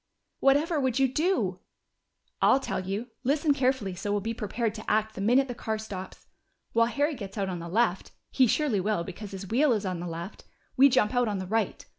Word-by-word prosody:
"Whatever 295 +4 +3
would 260 -3 0
you 270 0 +4
do?" 255 - 0 0.8
"I'll 265 - +5
tell 270 - -3
you. 195 +6 -4
Listen 290 +3 +2
carefully, 255 -8 0
so 195 +3 -4
we'll 205 - +1
be 225 +3 -3
prepared 225 0 -2
to 215 -1 -7
act 215 0 +1
the - - -6
minute 250 +6 +3
the 245 - -4
car 220 -2 -3
stops. 195 -4 -8 0.5
While 230 0 +4
Harry 290 +5 0
gets 200 -6 -8
out 195 -2 -1
on 180 -2 -4
the 170 0 -7
left 205 -1 +1 0.2
he 260 -2 +4
surely 260 -4 +1
will, 200 -2 0
because 195 +3 -8
his 195 0 -7
wheel 270 +5 +3
is 210 -2 -2
on 185 -2 -2
the 175 - -5
left 170 +4 -7 0.3
we 275 +2 +7
jump 245 -4 +2
out 245 -1 +2
on 205 -2 -1
the 185 - -4
right. 220 +4 -1
220 Hz, 215 wpm, -28 LUFS, 195-260 Hz, 0.8 s, we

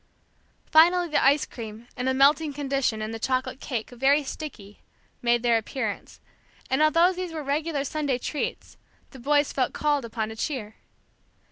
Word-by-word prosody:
Finally 345 +2 +5
the 300 - +2
ice 280 +2 +4
cream, 225 0 -9
in 250 +1 -3
a 260 - +2
melting 290 +3 +4
condition, 275 -6 -1
and 215 +1 -4
the 225 - -5
chocolate 255 +1 -1
cake, 235 -4 -4
very 270 +4 +3
sticky, 240 -9 -8 0.4
made 240 0 +2
their 235 -2 +4
appearance; 220 -2 -5 0.5
and 265 +3 +2
although 335 +4 +4
these 365 -1 -5
were 310 -2 -4
regular 290 +1 -1
Sunday 285 -2 -1
treats, 290 +4 -4 0.3
the 265 - -12
boys 290 +3 +2
felt 260 -2 0
called 295 -2 0
upon 225 -1 -3
to 220 - -8
cheer. 225 -3 -4
270 Hz, 160 wpm, -26 LUFS, 235-300 Hz, 0.5 s, Finally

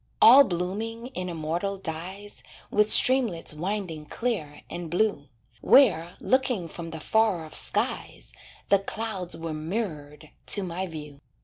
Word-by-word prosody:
All 265 +5 +9
blooming 220 +5 -4
in 185 0 -4
immortal 170 +4 -3
dyes, 185 +4 -7 0.3
With 210 +1 +3
streamlets 235 -14 +4
winding 170 -2 -4
clear 165 -12 -4
and 170 -1 -6
blue, 180 -6 0 0.3
Where, 180 - +4
looking 255 -9 0
from 165 +1 -8
the 160 0 -7
far 210 -2 +1
off 155 - -11
skies, - - -2 0.4
The 200 - +5
clouds 195 -4 -4
were 165 -1 -5
mirrored 155 -3 -5 0.2
to 200 - +3
my 185 +1 -4
view. 150 -4 -9
180 Hz, 130 wpm, -26 LUFS, 160-215 Hz, 0.4 s, All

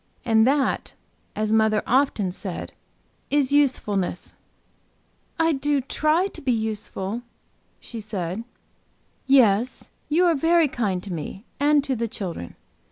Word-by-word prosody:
And 225 0 +4
that; 275 0 +1 0.4
as 215 0 0
mother 220 -1 +3
often 245 -7 +2
said, 185 -1 -6 0.6
is 285 -1 +2
usefulness." 210 -11 +1 1.1
"I 325 0 +4
do 290 0 +1
try 305 +6 +1
to 395 - -7
be 265 - 0
useful," 220 -1 -3 0.6
she 230 - -7
said. 200 -1 -4 0.8
"Yes, 245 -3 +3 0.2
you 340 +4 +3
are 345 - +4
very 325 +2 +3
kind 200 -9 -2
to 195 - -6
me 175 +6 -6
and 290 0 +4
to 270 -2 -1
the 230 0 -2
children. 175 - -6
235 Hz, 125 wpm, -24 LUFS, 205-285 Hz, 1.1 s, And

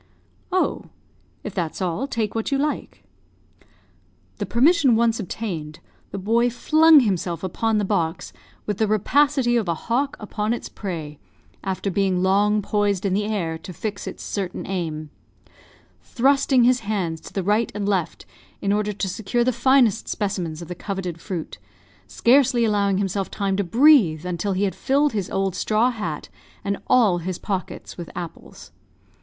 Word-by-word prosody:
"Oh, 370 0 0 0.6
if 210 - -6
that's 170 -5 -3
all, 185 +8 -1
take 225 -6 -2
what 225 +3 -2
you 275 - +2
like." 295 +2 -3 1.4
The - - -2
permission 270 0 +4
once 230 0 +2
obtained, 170 -7 -5 0.3
the 200 - -6
boy 230 +5 +2
flung 310 +5 +5
himself 180 -6 -1
upon 220 +4 0
the 205 - +1
box 170 -4 -2 0.3
with 210 -2 -3
the 220 - +2
rapacity 250 +4 +2
of 220 -5 -1
a 170 - 0
hawk 270 - -1
upon 210 +1 -2
its - - -8
prey, 160 -7 -6 0.4
after 195 0 -2
being 185 -1 +1
long 205 +2 +3
poised 205 -2 0
in 190 - +1
the 205 +2 0
air, 175 -7 -2
to 180 +3 -9
fix 200 +4 -5
its - - -7
certain 190 -3 -4
aim; 155 -5 -4 0.9
thrusting 270 0 +3
his 250 +1 +4
hands 190 -7 -2
to - - -11
the 195 - -2
right 210 +3 +1
and 205 -1 -2
left, 185 -5 -1 0.3
in 200 0 0
order 210 0 0
to 200 0 -3
secure 220 +5 -1
the 255 +1 +1
finest 240 -3 +3
specimens 180 -6 -3
of - - -10
the 180 - -5
coveted 180 -2 -5
fruit, 175 -6 -5 0.5
scarcely 245 -1 +3
allowing 200 -3 +1
himself 195 0 -1
time 195 -2 -1
to 200 - 0
breathe 205 - +5
until 180 +3 -2
he 190 +2 0
had 195 - 0
filled 285 +1 +1
his 200 -4 -2
old 195 -1 -1
straw 220 +6 +2
hat, 175 -10 -5 0.4
and 200 0 -2
all 210 -8 +4
his 180 +1 -4
pockets, 190 -2 -5
with 170 - -6
apples. 170 -2 -9
205 Hz, 160 wpm, -23 LUFS, 185-235 Hz, 1.4 s, flung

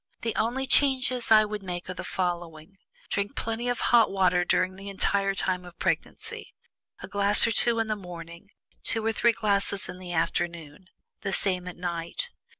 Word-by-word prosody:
The 230 -1 -2
only 245 +4 0
changes 255 -3 +3
I 215 -1 +7
would 210 0 -5
make 180 -2 -5
are 185 - -4
the - - -7
following: 175 0 -4 0.3
Drink 200 0 -1
plenty 230 +2 -2
of 245 - -1
hot 230 -2 +6
water 180 -2 +2
during 185 +1 +1
the 195 +1 -8
entire 195 0 +1
time 185 -1 -1
of 175 -1 -13
pregnancy: - - -3 0.5
a - - -6
glass 200 0 +4
or 230 - +1
two 230 +1 +3
in 225 -1 0
the 215 - 0
morning, 175 -1 -10 0.3
two 225 -1 -1
or 225 - +1
three 235 +1 +4
glasses 200 -2 0
in 180 - -8
the 180 -1 -7
afternoon, 165 -1 -2 0.4
the 195 -2 -2
same 180 -2 0
at 180 - -7
night. 175 - -3
195 Hz, 180 wpm, -27 LUFS, 180-225 Hz, 0.5 s, I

